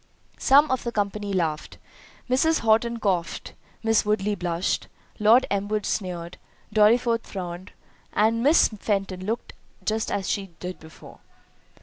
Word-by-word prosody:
Some 285 +2 +5
of 260 - 0
the 235 - -3
company 205 -1 -2
laughed—Mrs. 200 - -2
Horton 230 +1 +2
coughed—Miss 205 +3 -1
Woodley 210 -1 0
blushed—Lord 205 +6 +1
Elmwood 205 +1 -1
sneered—Dorriforth 210 +5 0
frowned—and 190 +4 -3
Miss 295 +6 +5
Fenton 195 -3 -2
looked 230 +2 -3 0.3
just 220 +1 -1
as 195 -2 -2
she 195 -4 -3
did 180 0 -6
before. 160 0 -14
210 Hz, 100 wpm, -25 LUFS, 185-230 Hz, 0.3 s, Some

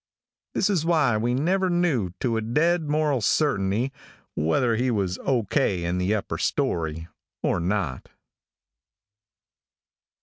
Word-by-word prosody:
"This - - +2
is 190 -7 +1
why 155 -8 +2
we 120 +3 0
never 185 +7 +1
knew 170 - +1
to 120 -4 0
a 110 - 0
dead 155 +8 +1
moral 150 -4 +1
certainty, 110 -1 +1 0.4
whether 115 - +1
he 125 +3 0
was 95 -5 -1
O. 125 -4 +1
K. 95 -3 0
in 90 +1 -1
the 95 +4 +1
upper 105 - -4
story, 80 -1 -1 0.4
or - - +1
not." 90 -7 -2
120 Hz, 130 wpm, -25 LUFS, 95-150 Hz, 0.4 s, This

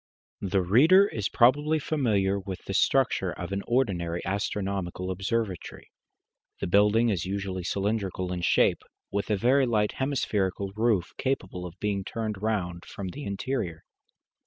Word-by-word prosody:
The 95 -1 +1
reader 155 - +6
is 105 - -3
probably 145 +6 +4
familiar 105 -11 +1
with 95 -1 -7
the - - -4
structure - - +2
of - - -6
an 100 0 -1
ordinary 90 -9 0
astronomical 95 -2 -2
observatory. 95 0 -3 0.7
The - - -2
building 105 +5 +4
is 95 -4 -1
usually 95 -1 -3
cylindrical 95 -2 -1
in 90 - -3
shape, - - +3 0.3
with 100 +2 -2
a 105 - +2
very 130 +6 +3
light 105 -3 +1
hemispherical 100 -8 -1
roof 110 -5 +1
capable 95 -9 -2
of 90 +2 -13
being 100 -2 -1
turned 110 -1 -4
round 90 -6 -2
from 95 -2 -6
the 145 +9 -7
interior. 100 -5 -3
100 Hz, 140 wpm, -27 LUFS, 95-115 Hz, 0.7 s, reader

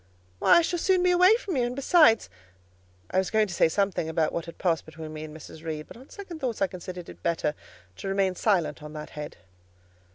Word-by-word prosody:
"Why, - - +6
I - - +6
shall 350 +1 -1
soon 370 +1 +2
be 360 - +4
away 365 +4 +6
from 405 -7 -4
you, 255 - +2
and 240 +1 -2
besides"—I 90 - +1
was 190 - -1
going 220 -1 +3
to 195 - -7
say 165 - +3
something 190 -2 0
about 160 -1 0
what 170 - -3
had 170 - -10
passed 170 -3 0
between 160 0 -9
me 155 0 -6
and 155 0 -9
Mrs. 160 +1 -12
Reed, 155 -2 -4
but - - -12
on 255 +4 -15
second 375 -5 -9
thoughts 250 -6 -2
I 195 - +3
considered 180 -1 -8
it - - -12
better 165 -3 0 0.4
to - - -6
remain 195 -1 +1
silent 175 -7 0
on 150 0 -9
that 150 0 -8
head. 150 -1 -7
175 Hz, 225 wpm, -27 LUFS, 155-245 Hz, 0.4 s, Why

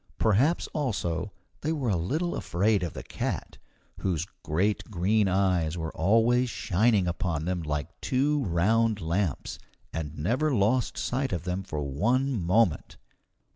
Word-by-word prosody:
Perhaps 125 - +3
also 100 - -2 0.3
they 155 - -1
were 135 -8 0
a - - +2
little 150 - -1
afraid 100 +4 +1
of 85 -3 -3
the - - -7
cat, - - -4 0.4
whose 90 -4 -1 0.2
great 100 +10 0
green 100 +2 +2
eyes 90 -4 +1
were 80 -1 -4
always 115 +7 +3
shining 105 -1 +2
upon 85 -2 -2
them 90 -1 -1
like 75 -3 -4
two 145 +2 +1
round 105 +5 +2
lamps, 85 -2 -2 0.3
and 80 -2 -4
never 125 - +1
lost 115 +5 +1
sight 130 +1 -1
of 85 -3 -2
them 90 +1 -2
for 75 -6 -4
one 120 - +1
moment. 90 +1 +1
100 Hz, 140 wpm, -28 LUFS, 85-120 Hz, 0.4 s, Perhaps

